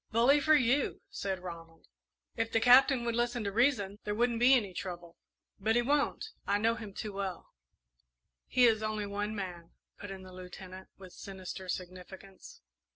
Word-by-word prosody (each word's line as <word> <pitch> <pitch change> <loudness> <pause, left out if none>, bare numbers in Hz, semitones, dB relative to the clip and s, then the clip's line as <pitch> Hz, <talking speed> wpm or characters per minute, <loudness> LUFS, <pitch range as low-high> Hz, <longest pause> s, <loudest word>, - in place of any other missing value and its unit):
"Bully 245 +6 +4
for 310 +2 +4
you!" 265 0 +1
said 190 -2 -3
Ronald. 165 -2 -10 0.5
"If 225 - -2
the 225 - +3
Captain 250 +1 +6
would 235 - 0
listen 240 0 0
to 200 - -2
reason, 210 -4 +1
there 210 0 -2
wouldn't 235 0 +1
be 255 +3 +7
any 205 -7 -1
trouble; 175 -2 -7 0.4
but 220 +3 +1
he 240 - +3
won't 290 - 0 0.2
I 200 - +2
know 225 +2 +2
him 225 -3 -8
too 205 +1 -6
well." 195 -3 -5 1.0
"He 250 - +4
is 220 -2 +4
only 215 -1 -2
one 205 +1 -3
man," 175 -4 -6 0.3
put 205 - -8
in 190 -1 -8
the 185 0 -12
Lieutenant, 185 +1 -10
with 185 -2 -13
sinister 190 -1 -8
significance. 185 - -8
205 Hz, 170 wpm, -31 LUFS, 185-240 Hz, 1.0 s, be